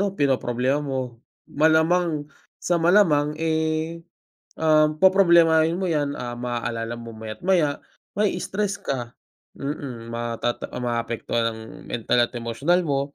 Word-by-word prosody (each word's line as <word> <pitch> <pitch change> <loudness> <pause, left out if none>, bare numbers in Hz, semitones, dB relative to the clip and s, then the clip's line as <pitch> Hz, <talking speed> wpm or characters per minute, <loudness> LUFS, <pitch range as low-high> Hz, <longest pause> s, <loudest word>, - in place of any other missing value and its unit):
'no 200 -1 0
pinoproblema 130 -1 +1
mo, 130 -4 -4 0.3
malamang 160 0 +2 0.3
sa 175 - +1
malamang, 165 -4 +4
eh, 160 +1 -1 0.6
um, 155 -1 +3
poproblemahin 170 -3 +5
mo 190 - -2
yan, 145 -3 0
ah, 120 -1 -4
maaalala 120 -1 -3
mo 115 -1 -9
maya't 110 +3 -8
maya, 170 -6 +2 0.4
ma-i-stress 205 -1 -1
ka. 120 -3 -4 0.4
Mm, 135 -5 -5
matata 120 0 -3
maapektuhan 120 -1 -2
ang 110 - -10 0.3
mental 120 +1 +1
at 120 - 0
emosyonal 125 +10 0
mo 140 -2 +1
145 Hz, 120 wpm, -23 LUFS, 120-165 Hz, 0.6 s, poproblemahin